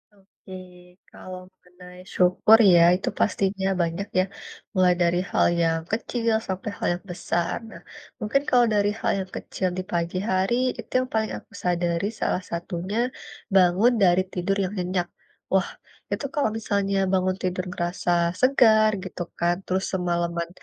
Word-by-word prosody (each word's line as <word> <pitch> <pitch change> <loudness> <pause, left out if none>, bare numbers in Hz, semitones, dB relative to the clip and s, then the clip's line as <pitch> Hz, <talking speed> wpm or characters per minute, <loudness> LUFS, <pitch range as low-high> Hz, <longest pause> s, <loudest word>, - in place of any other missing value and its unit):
Oke. 195 -1 -17 0.6
Kalau 185 0 -9
mengenai 180 -1 -15
syukur 185 +5 +5 0.2
ya, 170 - +7
itu 185 - -2
pastinya 195 -1 0
banyak 170 +4 -2
ya, - - +4 0.5
mulai 185 -1 +4
dari 175 0 +2
hal - - +3 0.2
yang 165 -1 +1
kecil 230 +1 -1
sampai 190 +2 -3
hal - - -1
yang 175 - -11
besar. 175 -1 -2
Nah, - - -11 0.4
mungkin 220 +6 +1
kalau 245 -1 +5
dari 205 -1 +2
hal - - +1
yang 190 -1 -5
kecil 185 - -3
di 185 - -2
pagi 170 +1 -1
hari, 190 +5 +1 0.2
itu - - -9
yang - - -7
paling 220 -1 0
aku - - -15
sadari 175 +1 0
salah - - +1
satunya, 175 +4 -4 0.6
bangun 190 +5 +5
dari 180 0 +5
tidur 185 +2 -1
yang 185 - -2
nyenyak. 180 -1 -1 0.4
Wah, - - +2 0.4
itu - - -2
kalau 290 -6 +2
misalnya 200 -2 -1 0.2
bangun 185 0 +1
tidur 185 0 -1
ngerasa 175 0 -2 0.3
segar 220 -5 +5
gitu 185 -1 -7 0.2
kan. 175 +1 +2
Terus 190 +1 -1
semaleman 170 -2 -1
185 Hz, 150 wpm, -24 LUFS, 175-200 Hz, 0.6 s, ya